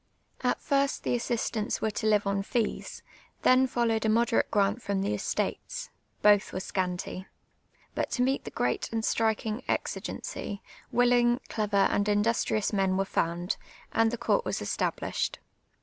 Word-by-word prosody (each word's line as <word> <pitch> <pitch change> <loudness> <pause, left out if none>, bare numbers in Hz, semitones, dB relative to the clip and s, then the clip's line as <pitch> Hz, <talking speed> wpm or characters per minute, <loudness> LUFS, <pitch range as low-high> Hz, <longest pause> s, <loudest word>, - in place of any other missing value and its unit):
At - - +1
first 280 -1 +1
the - - 0
assistants 230 -2 -1
were 220 - 0
to 220 +1 -2
live 210 -1 +3
on 200 0 0
fees; 225 +2 -2 0.4
tlien 255 0 +5
followed 230 -3 +1
a 220 - +2
moderate 230 +1 +2
p 210 - +2
ant 200 +3 +2
fiom 200 -4 -1
the 200 - 0
estates; - - -3 0.3
both 205 -1 +5
were - - -4
scnnty. 185 0 -3 0.7
IJut - - -1
to 250 - +1
meet 265 +2 +1
the - - -6
{J!;reat - - -1
and 225 -1 -1
striking; 220 +1 0
exi<;eney, 200 -1 -3 0.3
willinpj, 245 0 +3
clever, 210 -2 0
and 205 +1 +1
industrious 215 0 +1
men 190 -2 +2
were 195 - +1
found, 175 0 -1 0.3
and 225 0 +3
the 240 - -3
court 360 - +1
was - - -2
established. - - -2
220 Hz, 155 wpm, -29 LUFS, 200-240 Hz, 0.7 s, tlien